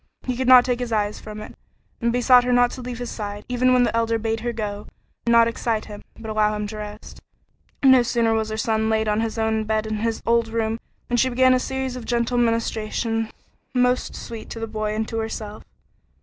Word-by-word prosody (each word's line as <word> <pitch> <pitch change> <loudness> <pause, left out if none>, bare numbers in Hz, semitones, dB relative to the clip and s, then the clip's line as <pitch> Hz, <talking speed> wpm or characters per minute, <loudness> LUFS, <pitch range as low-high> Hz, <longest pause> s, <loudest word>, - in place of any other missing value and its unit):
He 255 - -2
could 260 +1 -2
not 255 -1 +8
take 250 -1 0
his 245 -2 -4
eyes 210 -1 0
from 215 0 -8
it, - - -9 0.5
and 235 0 +2
besought 245 +1 +5
her 250 - 0
not 245 0 +4
to 255 - -7
leave 245 -1 -6
his 245 0 -5
side, 205 -1 -6
even 250 +1 +2
when 250 -1 +5
the 235 -1 0
Elder 230 0 +1
bade 225 0 -2
her 240 +2 -2
go 210 -2 -5 0.4
and - - +4
not 230 0 +6
excite 230 -1 -2
him, 205 -1 -10 0.2
but 225 - -8
allow 215 0 +2
him 210 0 -3
to 215 +1 -6
rest. 210 0 -9 0.6
No 260 -2 +7
sooner 230 -1 +1
was 220 -1 0
her 220 - -3
son 220 0 0
laid 220 0 +1
on 210 +1 +1
his 225 0 -3
own 220 0 +1
bed 215 0 -1
in 215 0 -2
his 225 +1 -1
old 235 0 +3
room 225 0 -1 0.3
than 240 - 0
she 260 +2 +3
began 255 +1 +4
a 255 - +3
series 265 0 -3
of 250 -2 -7
gentle 240 +1 0
ministrations 225 -1 0 0.5
most 250 0 +1
sweet 230 -2 -8
to 230 - -6
the 225 - -2
boy 215 -1 -3
and 220 0 -2
to 225 - -3
herself. 215 -1 -5
225 Hz, 230 wpm, -23 LUFS, 220-245 Hz, 0.6 s, not